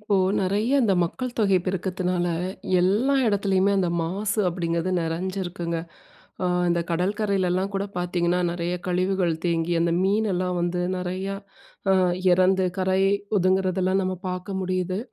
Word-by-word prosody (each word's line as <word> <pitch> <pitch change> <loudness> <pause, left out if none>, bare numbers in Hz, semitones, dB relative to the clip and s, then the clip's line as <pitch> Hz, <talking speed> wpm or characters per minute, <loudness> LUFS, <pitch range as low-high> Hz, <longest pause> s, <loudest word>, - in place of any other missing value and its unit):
இப்போ 210 -1 0 0.3
நிறைய 205 +5 0
அந்த 205 -5 +3
மக்கள் 250 +8 -4
தொகை 200 -4 +3
பெருக்கத்துனால, 185 -1 -1 0.5
எல்லா 210 +10 +2
இடத்துலயுமே 200 -2 +2
அந்த 180 -2 +1
மாசு 200 +5 -2
அப்டிங்றது 170 0 -1
நிறஞ்சிருக்குங்க. 175 0 -3 0.7
அ - - +2 0.2
இந்த 170 0 +2
கடற்கரையிலலாம் 190 +1 0
கூட 195 0 0
பாத்தீங்கன்னா, 175 0 0
நிறைய 175 0 -2
கழிவுகள் 180 -1 +1
தேங்கி 170 0 0
அந்த 170 0 +2
மீனெல்லாம் 190 -3 0
வந்து 175 +1 -1 0.2
நிறையா 185 +2 -3 0.6
அ - - +5 0.4
இறந்து 185 +1 +3
கரை 190 0 +2 0.4
ஒதுங்குறதெல்லாம் 185 0 +1
நம்ம 185 0 -2
பாக்க 180 +2 -5
முடியுது. 185 0 -1
185 Hz, 125 wpm, -24 LUFS, 175-195 Hz, 0.7 s, அ